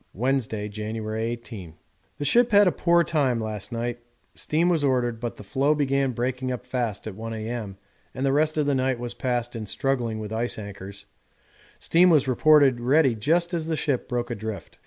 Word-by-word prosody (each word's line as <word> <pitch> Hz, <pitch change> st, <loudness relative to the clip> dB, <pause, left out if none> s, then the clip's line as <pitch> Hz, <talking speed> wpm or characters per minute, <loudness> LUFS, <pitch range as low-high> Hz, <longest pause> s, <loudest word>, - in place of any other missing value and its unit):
Wednesday, 115 Hz, -2 st, -1 dB
January 110 Hz, +1 st, -4 dB
18. 115 Hz, -8 st, -6 dB, 0.4 s
The 145 Hz, -, -3 dB
ship 240 Hz, -, +4 dB
had 205 Hz, -1 st, +6 dB
a -, -, +4 dB
poor 170 Hz, 0 st, +3 dB
time 135 Hz, -8 st, +1 dB
last 110 Hz, 0 st, -5 dB
night; 120 Hz, +1 st, -3 dB, 0.3 s
steam 160 Hz, +3 st, 0 dB
was 165 Hz, -4 st, +2 dB
ordered, 125 Hz, -4 st, +1 dB
but 120 Hz, -1 st, -4 dB
the -, -, -11 dB
floe 135 Hz, +9 st, +1 dB
began 140 Hz, -2 st, +1 dB
breaking 130 Hz, +2 st, -2 dB
up 125 Hz, 0 st, -5 dB
fast 120 Hz, -5 st, -3 dB
at 110 Hz, -, -5 dB
1 115 Hz, +3 st, -6 dB
A.M., 110 Hz, -3 st, -5 dB, 0.3 s
and 130 Hz, -, -3 dB
the 135 Hz, -, +2 dB
rest 155 Hz, +2 st, +2 dB
of 150 Hz, -, +2 dB
the 145 Hz, -, +2 dB
night 130 Hz, -1 st, +1 dB
was 120 Hz, 0 st, -5 dB
passed 120 Hz, -1 st, -2 dB
in 110 Hz, -2 st, -5 dB
struggling 125 Hz, -3 st, -1 dB
with 110 Hz, 0 st, -6 dB
ice 115 Hz, +2 st, -1 dB
anchors; 100 Hz, -1 st, -8 dB, 0.7 s
steam 180 Hz, +2 st, +4 dB
was 150 Hz, -6 st, +4 dB
reported 140 Hz, -1 st, +5 dB
ready 135 Hz, +2 st, +3 dB
just 170 Hz, -, +1 dB
as 165 Hz, -2 st, -2 dB
the 165 Hz, -, 0 dB
ship 145 Hz, -5 st, -1 dB
broke 120 Hz, 0 st, -2 dB
adrift. 110 Hz, -6 st, -6 dB
125 Hz, 190 wpm, -25 LUFS, 110-145 Hz, 0.7 s, had